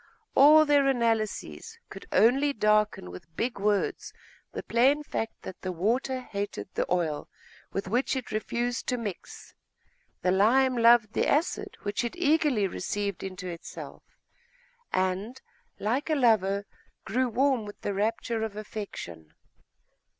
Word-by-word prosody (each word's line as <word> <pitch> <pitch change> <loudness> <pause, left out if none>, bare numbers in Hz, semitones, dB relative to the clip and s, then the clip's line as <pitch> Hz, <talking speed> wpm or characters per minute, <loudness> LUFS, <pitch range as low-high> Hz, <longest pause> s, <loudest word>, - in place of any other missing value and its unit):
All 305 +3 +7
their 290 -2 +4
analyses 235 - -1
could - - -10
only 275 +5 +4
darken 210 - +1
with 155 - -12
big 235 +2 -2
words 205 0 0 0.4
the - - -6
plain 270 +6 +3
fact 225 -6 -4
that 190 - -9
the 185 - -3
water 240 +9 0
hated 200 -5 -5
the - - -2
oil 165 -5 -1 0.4
with 195 - -3
which 245 +7 0
it 260 -2 -5
refused 235 +3 -2
to 250 - 0
mix, 210 -6 -7 0.7
the 180 - +3
lime 250 +7 +4
loved 235 -2 +5
the - - +1
acid 360 +7 0
which 205 +3 -1
it 240 - -3
eagerly 300 - +2
received 200 +1 -3
into 185 -1 -6
itself, 170 -2 -8 0.9
and, 190 +7 -1 0.4
like 245 +9 -1
a 310 - +2
lover, 205 -6 +2 0.4
grew 250 +4 0
warm 260 0 +2
with 205 - -10
the 205 - -2
rapture 225 +3 -1
of 220 -2 -3
affection. 200 - -8
220 Hz, 135 wpm, -28 LUFS, 200-260 Hz, 0.9 s, All